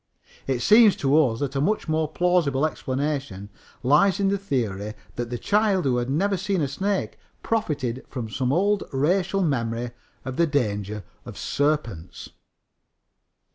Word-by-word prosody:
It 130 Hz, -3 st, 0 dB
seems 215 Hz, -1 st, +7 dB
to 140 Hz, +1 st, +1 dB
us 130 Hz, -8 st, +3 dB
that 140 Hz, -1 st, -2 dB
a 135 Hz, -, +1 dB
much 210 Hz, +6 st, 0 dB
more 155 Hz, 0 st, +1 dB
plausible 165 Hz, -6 st, +2 dB
explanation 135 Hz, -9 st, -3 dB, 0.3 s
lies 155 Hz, +10 st, +4 dB
in 195 Hz, -1 st, +2 dB
the 200 Hz, -, +1 dB
theory 110 Hz, -, -2 dB, 0.2 s
that 120 Hz, -1 st, -3 dB
this 120 Hz, -1 st, -4 dB
child 205 Hz, -4 st, +2 dB
who 125 Hz, -2 st, +2 dB
had 120 Hz, +1 st, -2 dB
never 195 Hz, +8 st, +1 dB
seen 190 Hz, +1 st, -1 dB
a 145 Hz, -, +1 dB
snake 190 Hz, +8 st, -2 dB, 0.2 s
profited 145 Hz, -, -1 dB
from 125 Hz, -4 st, -5 dB
some 125 Hz, +3 st, -1 dB
old 200 Hz, +6 st, +2 dB
racial 180 Hz, +7 st, +1 dB
memory 120 Hz, -5 st, -1 dB, 0.3 s
of 130 Hz, -1 st, -5 dB
the 170 Hz, -, +3 dB
danger 105 Hz, -7 st, -1 dB, 0.2 s
of -, -, -10 dB
serpents. 140 Hz, -, -2 dB
145 Hz, 150 wpm, -24 LUFS, 120-185 Hz, 0.3 s, seems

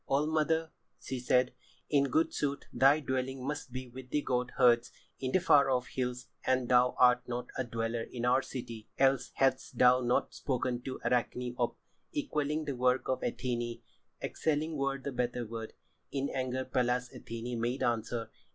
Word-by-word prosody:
old 145 Hz, +2 st, +2 dB
mother," 160 Hz, +1 st, +1 dB, 0.3 s
she 130 Hz, -, -4 dB
said. 125 Hz, +1 st, +2 dB, 0.3 s
"In 140 Hz, -2 st, +3 dB
good 160 Hz, +5 st, +1 dB
sooth 140 Hz, -1 st, -1 dB
thy 135 Hz, +3 st, +5 dB
dwelling 130 Hz, -1 st, -2 dB
must 145 Hz, -2 st, -4 dB
be 130 Hz, 0 st, -5 dB
with 125 Hz, +1 st, -10 dB
the 145 Hz, +2 st, 0 dB
goat 125 Hz, 0 st, 0 dB
herds 120 Hz, -1 st, +5 dB, 0.3 s
in 130 Hz, -1 st, -2 dB
the -, -, +4 dB
far 145 Hz, -6 st, +5 dB
off 125 Hz, -1 st, 0 dB
hills 125 Hz, -1 st, -3 dB, 0.2 s
and 130 Hz, -1 st, +1 dB
thou 125 Hz, 0 st, +5 dB
art 125 Hz, 0 st, +5 dB
not 125 Hz, 0 st, -4 dB
a 130 Hz, -, 0 dB
dweller 115 Hz, -1 st, -2 dB
in 120 Hz, +1 st, -4 dB
our 125 Hz, +2 st, +4 dB
city. 115 Hz, -5 st, -7 dB
Else 135 Hz, -1 st, +3 dB
hadst 135 Hz, -1 st, +1 dB
thou 125 Hz, 0 st, +6 dB
not 120 Hz, 0 st, +1 dB
spoken 125 Hz, -2 st, -1 dB
to 130 Hz, +1 st, -5 dB
Arachne 125 Hz, +1 st, 0 dB
of 120 Hz, -, +1 dB, 0.4 s
equalling 155 Hz, -, -1 dB
the 140 Hz, -2 st, -2 dB
work 125 Hz, +1 st, +2 dB
of 130 Hz, -, 0 dB
Athené; 120 Hz, -2 st, -2 dB, 0.4 s
excelling 155 Hz, +1 st, -1 dB
were 140 Hz, -1 st, 0 dB
the 140 Hz, +1 st, -5 dB
better 125 Hz, -1 st, -1 dB
word." 110 Hz, 0 st, -6 dB, 0.4 s
In 140 Hz, 0 st, -1 dB
anger 130 Hz, 0 st, -2 dB
Pallas 125 Hz, -1 st, 0 dB
Athené 115 Hz, +1 st, -5 dB
made 120 Hz, +3 st, -1 dB
answer. 115 Hz, -1 st, -1 dB
125 Hz, 170 wpm, -32 LUFS, 125-135 Hz, 0.4 s, thou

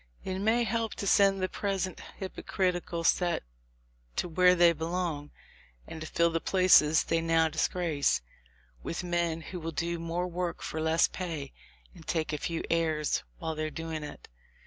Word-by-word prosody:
It 190 Hz, 0 st, -3 dB
may 220 Hz, +4 st, +3 dB
help 225 Hz, 0 st, -1 dB
to -, -, -4 dB
send 195 Hz, -1 st, +4 dB
the -, -, +2 dB
pres 195 Hz, -1 st, -1 dB
ent 185 Hz, -, -9 dB, 0.2 s
hypocritical 180 Hz, -3 st, -2 dB
set 175 Hz, -, +2 dB, 0.7 s
to -, -, -1 dB
where 180 Hz, +2 st, +5 dB
they 170 Hz, -1 st, +6 dB
belong, 165 Hz, -2 st, -3 dB, 0.6 s
and 160 Hz, -, -8 dB
to 155 Hz, -, -6 dB
nil 170 Hz, 0 st, +4 dB
the 165 Hz, -, 0 dB
places 180 Hz, -5 st, +5 dB
they 165 Hz, 0 st, 0 dB
now 165 Hz, -1 st, +3 dB
disgrace, 155 Hz, -1 st, +1 dB, 0.6 s
with 170 Hz, -, -4 dB
men 170 Hz, -2 st, 0 dB
who 180 Hz, +2 st, -7 dB
will 165 Hz, 0 st, -4 dB
do 170 Hz, +2 st, -2 dB
more 170 Hz, +2 st, -2 dB
work 175 Hz, 0 st, -3 dB
for 160 Hz, -, -3 dB
less 160 Hz, +1 st, +3 dB
pay, 160 Hz, -7 st, -5 dB, 0.4 s
and 160 Hz, -, -15 dB
take 160 Hz, -2 st, -1 dB
a 150 Hz, -, -2 dB
fewer 165 Hz, +2 st, -3 dB
airs 160 Hz, -2 st, +1 dB, 0.2 s
while 160 Hz, -, -3 dB
they 155 Hz, 0 st, -3 dB
are 155 Hz, -, -1 dB
doing 160 Hz, 0 st, -5 dB
it. 145 Hz, -, -9 dB
170 Hz, 170 wpm, -30 LUFS, 160-180 Hz, 0.7 s, they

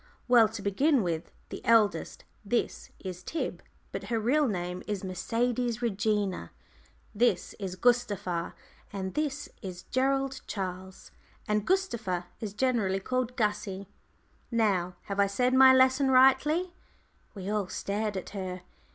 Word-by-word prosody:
"Well, 240 Hz, -3 st, +7 dB
to 215 Hz, -2 st, -7 dB
begin 265 Hz, +6 st, +2 dB
with, 165 Hz, -2 st, -3 dB, 0.2 s
the -, -, -7 dB
eldest. 225 Hz, -3 st, +2 dB, 0.2 s
This 235 Hz, +3 st, -1 dB
is 185 Hz, -2 st, -7 dB
Tib 320 Hz, -, -4 dB, 0.3 s
but -, -, -5 dB
her 230 Hz, -1 st, -1 dB
real 275 Hz, +7 st, +2 dB
name 180 Hz, -3 st, -3 dB
is 205 Hz, -2 st, -3 dB
Mercedes 235 Hz, +6 st, -1 dB
Regina; 205 Hz, -, 0 dB, 0.6 s
this 210 Hz, -4 st, +1 dB
is 190 Hz, -3 st, -4 dB
Gustava; 205 Hz, -7 st, 0 dB, 0.4 s
and 190 Hz, -2 st, -4 dB
this 290 Hz, -1 st, -2 dB
is 180 Hz, -3 st, -7 dB
Gerald 270 Hz, +1 st, 0 dB
Charles. 190 Hz, -1 st, -6 dB, 0.4 s
And 210 Hz, -1 st, 0 dB
Gustava 235 Hz, -, 0 dB
is 210 Hz, -2 st, -5 dB
generally 215 Hz, -6 st, +1 dB
called 250 Hz, +4 st, -2 dB
'Gussie.' 210 Hz, -3 st, -2 dB, 0.6 s
Now, 195 Hz, -7 st, +1 dB
have 200 Hz, 0 st, -4 dB
I 200 Hz, -, +5 dB
said 250 Hz, +6 st, +1 dB
my 260 Hz, 0 st, +8 dB
lesson 260 Hz, +1 st, +4 dB
rightly?" 270 Hz, +7 st, +4 dB, 0.6 s
We 190 Hz, -1 st, -6 dB
all 210 Hz, -3 st, 0 dB
stared 205 Hz, +1 st, -2 dB
at 185 Hz, -, -6 dB
her. 185 Hz, -2 st, -5 dB
210 Hz, 135 wpm, -29 LUFS, 190-255 Hz, 0.6 s, my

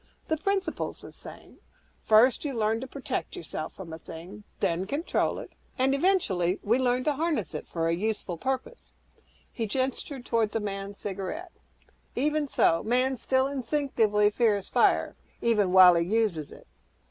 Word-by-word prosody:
The 315 Hz, -, +1 dB
principle's 390 Hz, +2 st, -2 dB
the -, -, -10 dB
same; -, -, -12 dB, 0.5 s
First 225 Hz, +4 st, +5 dB
you 285 Hz, -4 st, -3 dB
learn 220 Hz, 0 st, +1 dB
to 265 Hz, -, -5 dB
protect 265 Hz, -1 st, -4 dB
yourself 155 Hz, -1 st, -6 dB
from 170 Hz, -4 st, -9 dB
a 160 Hz, -, -7 dB
thing; 180 Hz, +7 st, -10 dB
then 170 Hz, +2 st, 0 dB
control 295 Hz, -, 0 dB
it; -, -, -8 dB, 0.3 s
and, 265 Hz, +1 st, +2 dB
eventually, 220 Hz, -, +1 dB
we 230 Hz, +5 st, +2 dB
learn 250 Hz, 0 st, +1 dB
to 300 Hz, -, +1 dB
'harness' 300 Hz, -, -1 dB
it 150 Hz, -, -6 dB
for 165 Hz, -1 st, -1 dB
a 165 Hz, -, +2 dB
useful 200 Hz, -1 st, -2 dB
purpose." 265 Hz, -, -4 dB, 0.6 s
He 225 Hz, -2 st, -2 dB
gestured 260 Hz, +2 st, -3 dB
toward 225 Hz, -3 st, +1 dB
the 225 Hz, -, +1 dB
man's 200 Hz, -1 st, -5 dB
cigarette, 205 Hz, -, -5 dB, 0.6 s
"Even 300 Hz, +3 st, +1 dB
so, 165 Hz, -10 st, +3 dB
man 255 Hz, +3 st, +1 dB
still 260 Hz, +2 st, +1 dB
instinctively 250 Hz, -7 st, +1 dB
fears 210 Hz, -3 st, +1 dB
fire -, -, +2 dB, 0.2 s
even 210 Hz, -5 st, +2 dB
while 185 Hz, -1 st, +9 dB
he 170 Hz, 0 st, +2 dB
uses 190 Hz, -6 st, 0 dB
it. -, -, -14 dB
225 Hz, 160 wpm, -28 LUFS, 195-270 Hz, 0.6 s, while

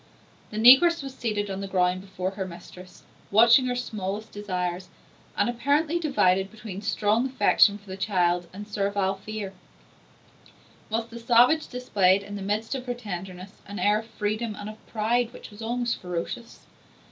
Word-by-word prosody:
The 215 Hz, -, -7 dB
negress 270 Hz, +8 st, +7 dB
was 270 Hz, -1 st, -7 dB
seated 210 Hz, -5 st, -2 dB
on 190 Hz, +1 st, -4 dB
the 195 Hz, -, -4 dB
ground 185 Hz, -1 st, +1 dB
before 190 Hz, -1 st, -4 dB
her 190 Hz, -1 st, -5 dB
mistress, 180 Hz, +1 st, -12 dB, 0.3 s
watching 235 Hz, +5 st, +6 dB
her 250 Hz, -, -1 dB
smallest 215 Hz, -3 st, -4 dB
desires, 180 Hz, -3 st, -4 dB, 0.5 s
and -, -, +2 dB
apparently 285 Hz, +7 st, +1 dB
divided 195 Hz, -, +2 dB
between 215 Hz, -3 st, -8 dB
strong 215 Hz, +3 st, +1 dB
affection 220 Hz, -5 st, +4 dB
for 205 Hz, -, -21 dB
the 190 Hz, -2 st, -7 dB
child 180 Hz, -3 st, +1 dB
and 205 Hz, +2 st, -9 dB
servile 200 Hz, -2 st, 0 dB
fear; 200 Hz, 0 st, -6 dB, 1.4 s
whilst 225 Hz, +1 st, -2 dB
the 235 Hz, -, -8 dB
savage 245 Hz, +6 st, +4 dB
displayed, 200 Hz, -6 st, +2 dB
in 205 Hz, +1 st, -8 dB
the 200 Hz, -, -6 dB
midst 210 Hz, +5 st, -2 dB
of 260 Hz, -2 st, -5 dB
her 245 Hz, -, -2 dB
tenderness, 190 Hz, -3 st, -8 dB
an 200 Hz, +1 st, -7 dB
air 205 Hz, +3 st, +2 dB
of 225 Hz, -, -10 dB
freedom 215 Hz, +1 st, -3 dB
and 210 Hz, +1 st, -7 dB
of 215 Hz, -, -18 dB
pride 235 Hz, +2 st, 0 dB
which -, -, -11 dB
was 205 Hz, +2 st, -12 dB
almost 240 Hz, +1 st, -2 dB
ferocious. 180 Hz, +6 st, -6 dB
210 Hz, 165 wpm, -26 LUFS, 190-235 Hz, 1.4 s, negress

